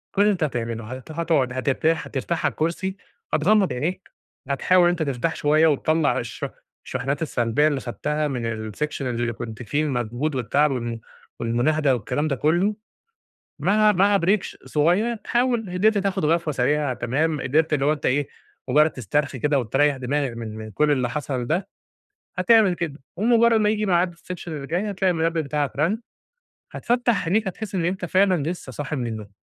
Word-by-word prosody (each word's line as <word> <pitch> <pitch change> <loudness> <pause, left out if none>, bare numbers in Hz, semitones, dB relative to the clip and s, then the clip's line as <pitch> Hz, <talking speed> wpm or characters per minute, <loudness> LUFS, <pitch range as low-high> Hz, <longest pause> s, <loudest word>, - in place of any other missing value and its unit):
كل 200 - +3
اللي 210 0 +5
أنت 175 -4 -2
هتعمله، 115 -5 -2
هت 130 +5 -8
هتقعد، 160 -6 0
هترتاح 140 +5 0
هترتاح 160 +5 -2
على - - +2
الكرسي، 190 +4 -2 0.4
هتغمض 195 +5 +3
عينيك، 170 +9 -3 0.4
هتحاول 180 +6 +3
إن 175 - +5
أنت 175 -2 0
ترتاح 140 +3 -1
شوية 155 +2 +3
وتِطَلَع 155 +1 +2
الشحن - - -5 0.4
الشحنات 140 +4 -3
السلبية 130 0 +1
اللي 140 -3 0
خدتها 150 +5 -2
من 115 -5 -3
الsection 150 +6 -3
اللي 120 -2 -1
كنت 115 +1 -7
فيه، 145 +7 0
المجهود 130 +2 -2
والتعب 140 +4 +2
و 120 -2 -3 0.4
والمناهدة 135 +5 +1
والكلام 145 +7 -2
ده 140 - 0
كله. 175 - +1 0.8
مع 215 +1 +4
مع 200 +1 +4
break 190 +4 +2
ش - - -8
صغير 185 +10 +1
حاول 240 -4 +1
إن 180 +3 -2
أنت 220 -1 +5
تاخد 195 -3 0
غفوة 165 0 +1
سريعة، 140 +1 +1
تمام 150 +5 -1
قدرت 155 +4 +1
اللي 140 -1 +1
هو 150 - +4
أنت 150 - -6
ايه 140 +2 +1 0.4
مجرد 150 +4 +5
تسترخي 135 +3 -2
كده 145 +2 +2
وتريح 135 +4 +2
دماغك 135 +1 -1
من 110 -2 -6
من 110 0 -8
كل 150 +8 +2
اللي 125 -4 +1
حصل 130 -3 -3
ده، 180 +5 0 0.7
هتعمل 195 0 +5
كده، 160 -4 -5 0.2
ومجرد 230 +2 +4
ما 210 - +3
ييجي 215 0 0
ميعاد 175 -1 +2
الsection 180 +1 -8
اللي 150 -4 -5
جاي 185 +8 -1
هتلاقي 190 -1 +1
المنبه 165 0 0
بتاعك 145 -1 -2
رن، 170 +10 +1 0.7
هتفَتَح 240 -6 0
عنيك، 195 +4 +1
هتحس 205 +1 -6
إن 175 -3 0
أنت 185 +1 -1
فعلًا 185 -3 +2
لسه 160 -4 -5
صاحي 145 +3 -4
من 120 -2 -2
النوم، 110 -2 -6
150 Hz, 175 wpm, -23 LUFS, 130-180 Hz, 0.8 s, اللي